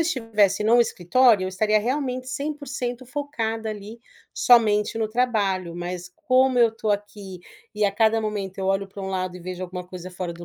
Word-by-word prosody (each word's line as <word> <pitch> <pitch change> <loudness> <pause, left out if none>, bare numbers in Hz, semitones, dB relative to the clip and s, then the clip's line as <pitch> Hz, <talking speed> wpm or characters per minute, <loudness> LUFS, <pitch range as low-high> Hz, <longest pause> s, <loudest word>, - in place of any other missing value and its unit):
estivesse 220 - +1
num 230 +3 +5
escritório, 225 +1 +3
eu - - -2
estaria 215 +3 +2
realmente 255 +1 -2
100% 265 -3 -4
focada 235 -5 -3
ali, 215 +2 -7 0.3
somente 215 -3 +4
no 220 -1 -1
trabalho, 205 -7 0
mas 175 0 -5
como 260 -4 +2
eu 235 -1 +6
estou 220 -1 -1
aqui 205 -2 -6 0.3
e 210 0 +1
a 200 - +3
cada 220 +2 +2
momento 205 -3 -4
eu 190 - -2
olho 195 +1 +1
pra 195 +1 -9
um 190 - -4
lado 185 -1 -3
e - - -11
vejo 185 +1 -5
alguma 180 0 -7
coisa 180 0 -9
fora 180 -1 -5
do 170 +1 -10
215 Hz, 185 wpm, -24 LUFS, 190-245 Hz, 0.3 s, eu